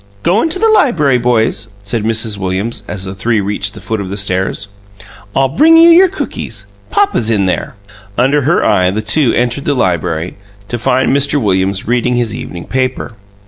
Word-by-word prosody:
"Go 190 +6 +2
into 330 +2 -1
the 450 - +2
library, 175 - +3
boys," 115 -2 0
said 105 +2 -2
Mrs. 110 -1 0
Williams, 95 +4 -3
as 100 -2 -4
the 95 - -5
three 110 +3 0
reached 100 0 -2
the - - -9
foot 110 +1 -3
of 95 - -6
the 100 - -5
stairs. 95 +1 -1 0.7
"I'll 135 0 +3
bring 315 - +4
you 335 +1 +7
your 365 +3 +6
cookies. 390 - -6 0.2
Papa's 390 - +1
in 105 -4 +1
there." 95 - -2 0.4
Under 135 +4 +2
her 150 +6 +1
eye 90 0 +3
the 105 +3 -3
two 120 +3 +2
entered 125 +3 -1
the 145 - +1
library, 85 -5 -1 0.3
to 120 - -3
find 130 +3 +1
Mr. 140 +1 +2
Williams 95 -3 -1
reading 125 +1 +1
his 120 -3 -1
evening 85 -7 -7
paper. 130 -2 -2
115 Hz, 185 wpm, -13 LUFS, 100-140 Hz, 0.7 s, you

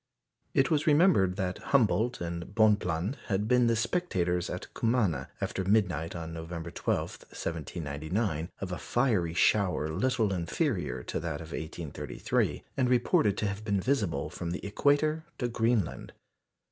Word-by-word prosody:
It 135 +3 +3
was 155 -1 +2
remembered 150 - +5
that 95 -1 -2
Humboldt 120 -3 +2
and 85 +3 -5
Bonpland 105 - +2
had 105 0 0
been 125 0 +4
the 115 - +3
spectators 95 - 0
at 90 - -6
Cumana, 105 - +1
after 95 - -2
midnight 90 -5 +1
on 80 -1 -5
November 85 0 -6
12, - - 0 0.3
1799, 80 +2 -3
of 95 -2 -4
a 90 - -3
fiery 105 -10 +1
shower 90 -5 +3
little 110 +3 +1
inferior 90 - -1
to - - -3
that 80 -2 -3
of 80 -1 -9
1833, 80 -1 -2
and 130 -2 +2
reported 115 -4 +3
to 105 - 0
have 100 +1 -4
been 100 -2 +1
visible 95 - 0
from 85 -1 -5
the 90 +3 -4
equator 145 +8 +2
to 125 - -1
Greenland. 115 -5 0
95 Hz, 145 wpm, -30 LUFS, 85-120 Hz, 0.3 s, remembered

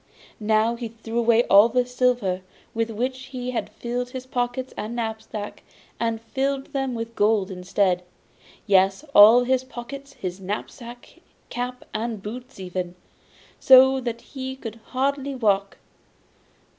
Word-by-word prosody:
Now 220 +1 +2
he 235 0 -5
threw 230 +1 -4
away 235 0 +4
all 205 +2 +6
the 250 +1 +2
silver 245 -7 +1 0.3
with 230 0 -1
which 255 +4 -3
he 255 -2 -5
had 245 - -3
filled 245 +1 -4
his 255 0 -7
pockets 250 0 -2
and 220 +3 -5
knapsack, 220 -2 -5 0.4
and 230 -1 0
filled 270 +5 -2
them 270 -3 -1
with 230 0 -5
gold 205 -2 +2
instead 180 0 0 0.6
yes, 195 +5 +3
all 220 +4 +9
his 260 +1 +1
pockets, 270 +2 -9
his 185 0 -5
knapsack, 235 +5 -7 0.3
cap 250 +1 -4
and 225 0 -2
boots 245 +5 -8
even, 180 -1 -4 0.6
so 265 0 +7
that 235 -2 -4
he 265 -1 -6
could 230 -4 -8
hardly 275 +1 -1
walk. 200 -5 +1
235 Hz, 135 wpm, -24 LUFS, 210-255 Hz, 0.6 s, all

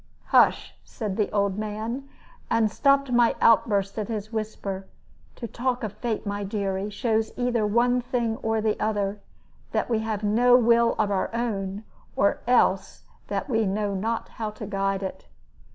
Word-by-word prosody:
"Hush!" - - +4
said 210 -6 -5
the 210 -1 0
old 200 -1 0
man; 220 +6 -4 0.4
and 230 -1 +3
I - - +1
stopped 275 +3 +2
my 240 -1 +4
outburst 200 -2 +3
at 210 - -3
his 215 -1 -5
whisper. 200 -3 -4 0.5
"To 235 - -6
talk 245 +2 -2
of 210 -2 -3
fate, 225 0 -3
my 205 0 -3
dearie, 195 -1 -2
shows 220 +1 0
either 245 -3 +1
one 245 +3 +2
thing 240 -3 -1
or 225 0 -1
the 215 -1 0
other 205 -1 -1 0.5
that - - -1
we 225 - +2
have 220 -1 -3
no 245 +4 +5
will 235 -1 +4
of 205 - +1
our 190 -1 0
own, 205 -4 -2 0.3
or 200 - +2
else 195 -6 +2 0.2
that - - -3
we 225 -5 +1
know 200 +1 -1
not 225 +4 -2
how 220 -2 -4
to 210 +1 -8
guide 195 -1 -1
it. 190 0 -6
215 Hz, 170 wpm, -25 LUFS, 200-235 Hz, 0.5 s, no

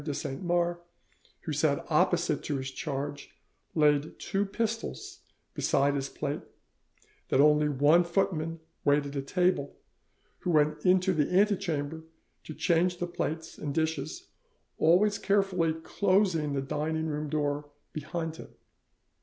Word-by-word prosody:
de 145 -1 -3
Saint 135 -2 -4
Mars, 175 -1 +1 0.6
who - - -4
sat - - +1
opposite - - +2
to 145 - -2
his 130 0 -4
charge, 145 0 -5 0.4
laid 150 -1 +2
two 195 +1 -1
pistols 225 +2 -3 0.3
beside 140 +1 +2
his 140 -1 -2
plate; 145 -1 -3 0.9
that - - +2
only 150 +1 +5
one 145 +5 +4
footman 170 -2 -1 0.2
waited 145 0 +2
at 135 0 -3
table, 180 -5 +1 0.6
who - - -3
went 150 -2 +2
into 185 0 +4
the 150 -4 +1
antechamber 175 -6 +1 0.4
to 155 - -8
change 175 0 +2
the 175 - -2
plates 160 -2 -4
and 145 -2 -4
dishes, 160 - -2 0.5
always 195 +6 +4
carefully 195 -5 +2
closing 170 -2 +1
the 135 -1 -1
dining 160 +3 -2
room 150 -1 -3
door 145 -1 -1 0.2
behind 160 +1 -4
him. - - -10
160 Hz, 130 wpm, -29 LUFS, 145-180 Hz, 0.9 s, only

